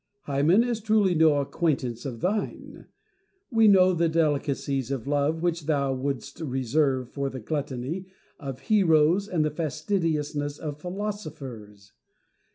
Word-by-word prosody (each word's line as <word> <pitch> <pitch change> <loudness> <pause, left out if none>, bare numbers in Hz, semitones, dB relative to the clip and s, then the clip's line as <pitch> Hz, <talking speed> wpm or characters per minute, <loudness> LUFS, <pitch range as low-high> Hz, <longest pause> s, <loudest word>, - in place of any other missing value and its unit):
Hymen 150 +8 +3
is 240 -2 -2
truly 215 -3 +3
no 160 -2 +5
acquaintance 135 -6 -1
of 120 -4 -7
thine. 205 +4 -3 0.6
We 225 -2 +5
know 185 -2 +6
the 170 -1 +1
delicacies 140 -4 0
of 135 -4 -3
love 145 +3 0
which 170 -3 -1
thou 140 -3 +1
wouldst 135 0 -4
reserve 130 -2 0
for 140 -1 -2
the 130 - -7
gluttony 145 - -4 0.3
of 135 -3 -6
heroes 180 -2 +3
and 165 -6 0
the 155 - 0
fastidiousness 150 -2 -2
of 150 -2 -6
philosophers. 145 - -6
150 Hz, 130 wpm, -26 LUFS, 135-175 Hz, 0.6 s, know